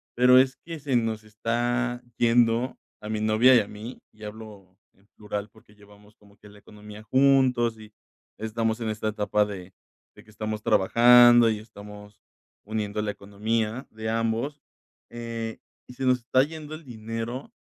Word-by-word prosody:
Pero 125 +1 +6
es 130 0 +2
que 165 -1 -9
se 140 -3 -2
nos 110 -2 -2
está 120 +3 -2 0.2
yendo 120 +1 +2 0.2
a 105 - -8
mi 110 -1 -2
novia 110 +4 +5
y - - +7
a 100 - -7
mí 110 +5 -10
y 105 - -17
hablo 105 -3 -11 0.2
en 100 +1 -30
plural, 105 0 -5
porque 105 -1 -22
llevamos 105 +1 -20
como 100 -1 -23
que 105 - -17
la 105 0 -16
economía 105 0 -13
juntos, 130 -3 +2
y 110 0 -13 0.5
estamos 110 +1 -2
en 110 - -2
esta 110 0 -3
etapa 105 0 0
de 95 -2 -9 0.4
de - - -16
que - - -23
estamos 110 0 -5
trabajando, 120 +3 +6
y 110 - -1
estamos 105 -1 -13 0.4
uniendo 105 0 -3
la 105 -1 -2
economía 110 +4 -3
de 110 0 -5
ambos, 115 +6 -2 0.5
eh, 115 -1 -6 0.3
y 125 - -11
se 130 - -4
nos 125 -1 +3
está 125 +2 +2
yendo 155 0 -8
el 155 - -12
dinero 115 - -6
110 Hz, 165 wpm, -25 LUFS, 105-120 Hz, 0.5 s, y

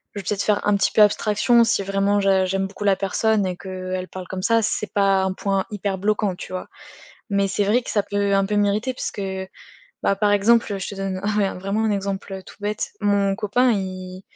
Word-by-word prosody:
je - - -3
vais - - -7
peut-être 205 -1 0
faire 210 -1 +1
un 205 - +4
petit 200 - +1
peu - - +4
abstraction 215 +3 +4
si 225 -3 +1
vraiment 195 +1 +1
j'a 195 -1 +3
j'aime 195 +1 -1
beaucoup 200 +1 -8
la 200 -2 +3
personne 205 +2 +1
et 180 -1 -2
que, 185 0 -6
elle 185 0 -3
parle 185 -1 -8
comme 185 0 -5
ça, 230 +4 +3
c'est 210 -1 -2
pas 195 -1 +3
un 190 - 0
point 195 0 -1
hyper 200 -1 -2
bloquant, 205 -1 0
tu - - -9
vois? 185 - -5 0.6
Mais 200 -1 +1
c'est 195 +1 0
vrai 235 +5 +2
que - - -5
ça 205 - +2
peut 200 0 0
un 195 0 +3
peu 210 +1 -2
m'irriter 205 +5 +1
puisque, 205 - -4 0.8
bah, 200 - +2
par 205 +1 +2
exemple, 205 0 +3
je 190 - -5
te 200 - -6
donne 195 -1 -3
un 205 +1 0
mais 200 -2 +2
vraiment 195 +4 -1
un 220 - +1
exemple, 195 -1 -3
heu, 190 0 -7
tout - - -14
bête. 210 +1 -3
Mon 200 -1 +2
copain 230 +4 +2
il 185 -2 -4
200 Hz, 235 wpm, -22 LUFS, 190-210 Hz, 0.8 s, un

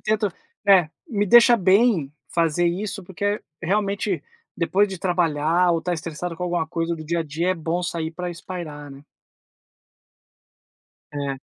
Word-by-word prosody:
tento 215 -1 +1 0.4
é, 190 -5 +6 0.2
me 205 -5 0
deixa 240 +3 +7
bem 190 - +3 0.2
fazer 170 0 +2
isso, 195 +3 -2
porque 205 +3 -2 0.2
realmente, 200 -2 0 0.3
depois 195 +5 +2
de 190 -2 -6
trabalhar 175 -1 +2
ou 165 - +1
estar 180 +2 -2
estressado 165 +1 -5
com 180 - -6
alguma 175 -2 -1
coisa 165 +1 -2
do 155 -1 -8
dia 170 +2 -1
a - - +1
dia, 160 +4 -2
é 185 - +1
bom 170 +2 -2
sair 165 -2 -3
pra 180 +1 -4
espairecer, 165 -5 -7
né. 135 0 -12 2.1
É. 140 -2 -3
175 Hz, 150 wpm, -23 LUFS, 160-195 Hz, 2.1 s, deixa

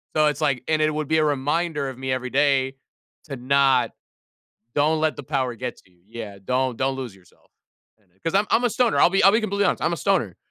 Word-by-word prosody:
So, 155 -1 +4
it's, 150 +1 -2
like 140 -5 0
and 155 -1 +1
it 155 - +2
would 155 -1 -3
be 160 0 +2
a 155 - +3
reminder 145 +1 -1
of 130 - -9
me 130 0 -3
every 130 -1 -3
day 135 -1 +2 0.5
to 140 -3 -6
not 130 -2 +2 0.8
don't 155 +2 +2
let 155 -3 0
the 145 - -7
power 130 -3 -2
get 125 +2 -5
to 95 - -23
you 90 -1 -31
yeah, 110 -3 -8
don't 130 -1 0
don't 135 0 0
lose 125 -6 -6
yourself. 95 -2 -25 0.5
And 100 -4 -36
it 95 - -37
'cause 165 - -2
I'm 205 +1 +3
I'm 245 - +3
a 245 - +2
stoner, 235 0 +1
I'll 175 - +5
be 195 - +2
I'll 195 +2 +7
be 220 - +3
completely 200 -2 0
honest, - - -1
I'm 170 - +1
a - - -1
stoner. 150 - 0
140 Hz, 245 wpm, -23 LUFS, 125-160 Hz, 0.8 s, I'll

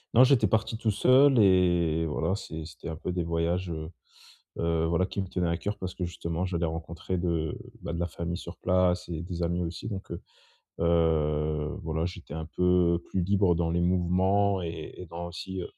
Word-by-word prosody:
Non, 125 - +9
j'étais 130 -5 +5
parti 110 +3 0
tout 110 0 0
seul 130 +5 +5
et 90 -5 +4
voilà 80 +5 0
c'est 80 -6 -6
c'était 80 0 -9
un 80 - -4
peu 90 - -4
des 90 0 -1
voyages, 85 +2 -1
heu 80 0 -5 0.7
heu, 85 -1 +1
voilà 85 +3 +2
qui 100 0 -3
me 95 - -4
tenaient 90 -1 -1
à 85 0 0
coeur 100 +4 -3
parce 95 -1 -5
que 90 - -3
justement 85 0 -3
j'allais 85 -2 -1
rencontrer 85 +2 -4
de 85 +4 -1 0.3
bah, 85 -1 -4
de 85 - -3
la 85 - 0
famille 85 +1 -4
sur 85 -1 -9
place 90 0 +2
et 80 -1 -3
des 85 -1 -4
amis 85 +1 0
aussi 85 +5 -5
donc 95 -2 -6
heu 85 - -4 0.6
heu, 75 -2 +1
voilà, 80 +1 -1
j'étais 90 -5 -7
un 80 -1 -4
peu 90 0 +2
plus 95 - -1
libre 95 -1 +3
dans 85 -1 0
les 85 - +1
mouvements 95 +2 +2
et 80 -2 -5
et 90 - -7
dans 85 +1 -6
aussi, 95 +2 -6
heu - - -3
85 Hz, 205 wpm, -28 LUFS, 85-95 Hz, 0.7 s, Non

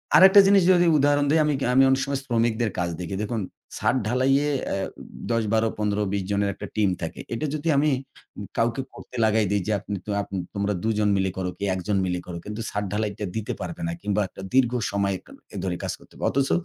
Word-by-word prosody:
আরেকটা 190 +2 +9
জিনিস 195 -1 +6
যদি 175 -1 +5
উদাহরণ 145 0 +3
দেই 160 - +4
আমি 150 - +2 0.2
আমি 135 +1 +6
অনেক 135 0 +3
সময় 140 -1 -2
শ্রমিকদের 115 -2 +1
কাজ 90 -1 0
দেখি। 90 +1 -4
দেখুন 110 +1 -2 0.4
ছাদ - - +1
ঢালাইয়ে 135 +4 +2 0.2
আ - - 0 0.6
১০, 115 -1 +2
১২, 110 0 +3
১৫, 105 0 0
২০ 100 -1 0
জনের 100 0 +1
একটা 105 - -8
টিম 105 -3 +3
থাকে। 80 - -5
এটা 115 +6 -2
যদি 155 +2 -4
আমি 150 +2 +3 0.7
কাউকে 115 +3 +1
করতে - - -12
লাগায় 110 0 +3
দেই 100 -1 +2
যে, - - 0
আপ - - -18 0.4
আপন 100 - -7 0.2
তোমরা 100 +1 0
দুজন 105 -2 +1
মিলে 95 -1 0
করো 95 -1 -1
কি - - -6
একজন 95 +2 -1
মিলে 90 -1 -1
করো 85 -1 -5
কিন্তু 105 +2 -5
ছাদ 105 - -2
ঢালাইটা 105 -1 -2
দিতে 110 -2 -2
পারবে 170 0 -5
না। - - -2
কিংবা 105 0 0
একটা - - -11
দীর্ঘ 125 -2 +4 0.2
সময় 100 -1 0 0.4
এ - - -4
ধরে 90 -2 -1
কাজ - - -2
করতে - - -20
হবে। - - -9
অথচ 135 0 +1
110 Hz, 210 wpm, -25 LUFS, 100-135 Hz, 0.7 s, আরেকটা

